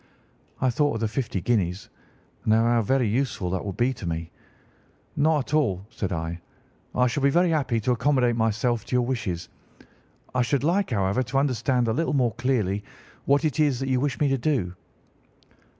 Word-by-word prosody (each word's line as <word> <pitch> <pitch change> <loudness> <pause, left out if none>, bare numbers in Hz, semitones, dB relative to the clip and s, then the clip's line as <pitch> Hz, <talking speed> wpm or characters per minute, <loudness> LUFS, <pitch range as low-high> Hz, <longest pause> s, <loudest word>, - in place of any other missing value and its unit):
"I 130 -1 +2
thought 145 +1 +1
of - - -2
the 110 - 0
fifty 110 -4 -2
guineas, 95 -4 0 0.6
and 110 - +3
of - - +4
how 120 0 +3
very 125 +2 +1
useful 110 -5 -1
they 95 - 0
would 100 +1 -6
be 120 +3 +2
to 100 -7 -7
me. 80 0 -4 0.8
'Not 150 -2 +2
at - - -7
all,' 100 -12 +1
said 95 - -3
I, 85 0 -3 0.5
'I 125 - +4
shall 125 +3 -1
be 140 - +4
very 175 +4 +3
happy 135 -7 +1
to 125 - +1
accommodate 125 0 +2
myself 115 +1 0
to - - -2
your 125 -1 +3
wishes. 105 -9 -3 0.9
I 125 - +2
should 130 +3 0
like, 185 +6 +1
however, 100 0 +1
to 130 +2 -2
understand 125 -2 +1
a 110 - +1
little 165 +6 0
more 125 -5 +2
clearly 110 -6 0 0.4
what 140 +3 +3
it 155 0 -1
is 145 -5 +2
that 135 0 -2
you 130 -1 +2
wish 140 -1 -1
me 150 - +3
to 135 -1 +1
do. 120 - 0
125 Hz, 195 wpm, -25 LUFS, 105-135 Hz, 0.9 s, of